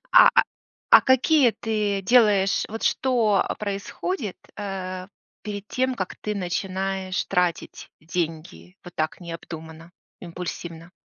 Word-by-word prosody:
А, - - +10
а, - - +7 0.5
а, - - +10
какие 260 0 +4
ты 210 -4 -1
делаешь 205 -4 +4
вот 225 +1 -6
что 230 -6 +2
происходит, 205 - -4 0.2
э, 185 -2 -5 0.3
перед 205 -1 -6
тем, 260 0 0
как 190 -3 -4
ты 210 -1 -2
начинаешь 190 0 -2
тратить 180 -3 -1
деньги 170 +3 -5
вот 175 -1 -11
так 155 0 -2
необдуманно, 165 -1 -9 0.3
импульсивно? 170 -1 -7
195 Hz, 115 wpm, -24 LUFS, 175-210 Hz, 0.5 s, А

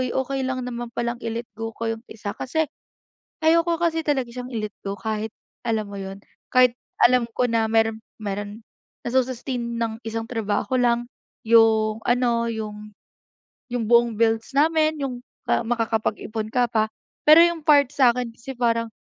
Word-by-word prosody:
"Uy 255 - +1
okey 270 +1 -1
lang 255 -1 -2
naman 240 -1 -5
palang 235 0 -2
i-let 230 +1 -3
go 225 0 -3
ko 230 - -4
yung 225 +1 -8
isa". 210 -2 -6
Kasi 315 +8 -1 0.8
ayoko 335 +1 +4
kasi 325 -1 +1
talaga 265 -5 +1
siyang 250 +1 -7
i-let 215 -2 -3
go 195 - -2
kahit 220 0 -3 0.4
alam 220 -2 0
mo 200 - -7
yun, 195 +1 -7 0.3
kahit 250 -1 +5 0.3
alam 245 -1 +5
ko 250 - +2
na 225 -1 +2
meron 225 0 +2 0.2
meron 205 +2 -5 0.4
na 240 - -2
sus-sustain 245 -2 -1
ng 225 -1 -2
isang 225 0 -3
trabaho 225 +3 -1
lang 240 0 +2 0.4
yung 220 -1 +5
ano, 240 -1 +2
yung 210 -1 -6 0.8
yung 240 -2 -1
buong 235 -1 +5
bills 225 0 +2
namin, 310 0 +3
yung 250 -2 -4 0.3
makakapag-ipon 220 -1 -1
ka 245 -1 +3
pa. 220 -1 +2 0.4
Pero 310 +2 +9
yung 340 -2 0
part 285 -4 +6
sa'kin 250 -4 +3
kasi 265 +3 -8
parang 230 -1 +1
235 Hz, 160 wpm, -23 LUFS, 225-255 Hz, 0.8 s, Pero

